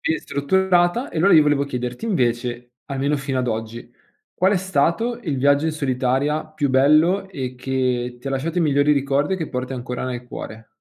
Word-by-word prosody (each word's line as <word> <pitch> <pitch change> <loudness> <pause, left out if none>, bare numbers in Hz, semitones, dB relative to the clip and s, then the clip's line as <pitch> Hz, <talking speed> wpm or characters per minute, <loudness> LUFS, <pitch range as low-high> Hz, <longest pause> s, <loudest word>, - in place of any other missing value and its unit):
sì, 160 - 0
strutturata 180 - +1
e - - -4
allora 195 +5 +5
io 155 - +8
volevo 145 -1 +2
chiederti 125 - -4
invece, 120 - -1
almeno 140 +1 -1
fino 135 -1 -3
ad 125 - -2
oggi, 115 +1 -5 0.4
qual 190 +2 +2
è - - +3
stato 190 +7 0
il 150 -9 -2
viaggio 140 +3 +3
in 160 - 0
solitaria 135 +1 0
più 155 -3 -2
bello 155 +9 +3
e 130 -8 -5
che 125 -1 -1
ti 125 - -13
ha - - -1
lasciato 145 +6 -2
i - - +3
migliori 145 -1 +3
ricordi 140 +4 +1
e - - -3
che 160 -4 -4
porti 125 +1 -4
ancora 125 0 -5
nel 125 -1 -4
cuore? 110 -2 -8
140 Hz, 195 wpm, -21 LUFS, 125-160 Hz, 0.4 s, io